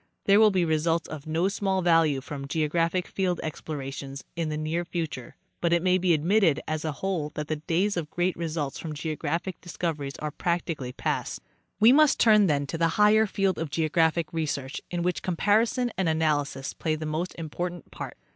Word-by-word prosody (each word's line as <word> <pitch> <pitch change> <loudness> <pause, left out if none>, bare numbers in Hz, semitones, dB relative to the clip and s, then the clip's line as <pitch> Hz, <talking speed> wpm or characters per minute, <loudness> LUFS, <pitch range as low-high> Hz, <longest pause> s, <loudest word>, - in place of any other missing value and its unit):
There 200 +1 +6
will 220 -1 +7
be 185 -3 +1
results 165 +1 +1
of 155 -1 -8
no 165 +4 +1
small 195 -2 0
value 165 -5 +3
from 140 0 -7
geographic 165 +4 0
field 180 -3 -1
explorations 140 -3 -6
in 165 -2 -2
the 150 - -2
near*future, 160 -4 -3 0.3
but 170 -1 +2
it 170 0 +2
may 185 0 +3
be 180 -2 +3
admitted, 165 -1 +3
as 155 0 -2
a 155 - -1
whole, 165 -1 -2
that 150 0 -4
the 155 - -1
days 180 +6 0
of 165 -4 -3
great 175 +3 0
results 155 -4 -3
from 160 -2 -5
geo 155 +1 -3
graphic 175 +3 -3
discoveries 160 -5 -4
are 150 0 -4
practically 165 -5 -2
past. - - -2 0.4
We 220 +3 +7
must 305 0 +5
turn, 215 -3 +6
then, 145 -3 +1
to 160 +4 -5
the 165 - +4
higher 215 +1 +5
field 195 -3 0
of 165 -2 -3
geographic 160 +1 +1
research, 145 -4 -3
in 175 -1 -2
which 180 -1 -1
comparison 220 +7 +1
and 185 -3 +2
analysis 145 -4 0
play 155 -1 -1
the 155 0 -5
most 155 +4 -3
important 175 +2 -5
part. - - -7
165 Hz, 185 wpm, -27 LUFS, 155-180 Hz, 0.4 s, will